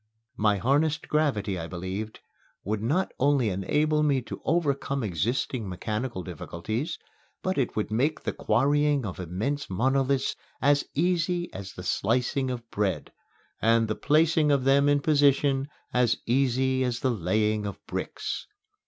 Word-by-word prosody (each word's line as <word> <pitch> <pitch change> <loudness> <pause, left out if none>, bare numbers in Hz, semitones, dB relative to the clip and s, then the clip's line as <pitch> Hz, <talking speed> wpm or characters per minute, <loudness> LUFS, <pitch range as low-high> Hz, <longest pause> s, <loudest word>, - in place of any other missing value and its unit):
My 105 -1 +2
harnessed 145 - +1
gravity, 105 - 0
I 80 - -5
believed, 95 +5 -5 0.4
would 105 +1 -2
not 155 - 0
only 140 -4 +3
enable 150 +11 +1
me 145 -3 +3
to - - -8
overcome 140 -5 0
existing 110 - -1
mechanical 105 +2 -3
difficulties, 110 - -4 0.5
but 185 0 0
it 130 -4 -1
would 110 0 -2
make 140 +8 +1
the - - -2
quarrying 145 -1 +2
of 95 -3 -6
immense 105 - -3
monoliths 135 +6 +1 0.2
as 145 +1 +3
easy 175 +2 0
as 95 0 -7
the 90 - -8
slicing 125 +7 0
of 120 -2 -5
bread, 100 -3 -1 0.5
and 115 0 +4
the 110 - 0
placing 155 +3 +3
of 140 -2 +2
them 140 +2 +4
in 145 0 +3
position 140 -2 +3 0.2
as 125 -2 +3
easy 130 +1 +2
as 125 -2 -1
the 130 - +2
laying 105 +1 0
of 100 - -6
bricks. - - -4
130 Hz, 145 wpm, -27 LUFS, 105-145 Hz, 0.5 s, and